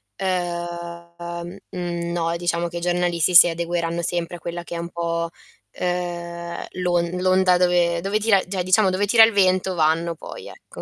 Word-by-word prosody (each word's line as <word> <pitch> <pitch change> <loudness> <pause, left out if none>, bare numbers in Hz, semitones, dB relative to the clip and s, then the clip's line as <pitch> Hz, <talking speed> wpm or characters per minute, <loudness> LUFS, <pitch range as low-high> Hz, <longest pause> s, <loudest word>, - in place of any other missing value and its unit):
ehm, 170 -1 -5
no 170 -1 -2
diciamo 170 0 -1
che 170 - -6
i - - -2
giornalisti 175 0 +1
si 170 - +10
adegueranno 170 0 -2
sempre 175 0 -3
a - - -17
quella 170 +1 -6
che 170 - -9
è 170 - -3
un 170 0 -5
po', 170 0 -2 0.4
ehm, 170 -1 -4
l'on 175 -1 0
l'onda 185 -1 +4
dove 175 -1 +2
dove 200 +3 0
tira 205 -3 +3
cioè 185 -2 -2
diciamo 190 +2 +3
dove 185 +2 0
tira 225 +2 +6
il 225 -1 +4
vento 185 -1 +2
vanno 165 +1 +1
poi, - - -10
ecco. - - -12
175 Hz, 165 wpm, -22 LUFS, 170-180 Hz, 0.4 s, si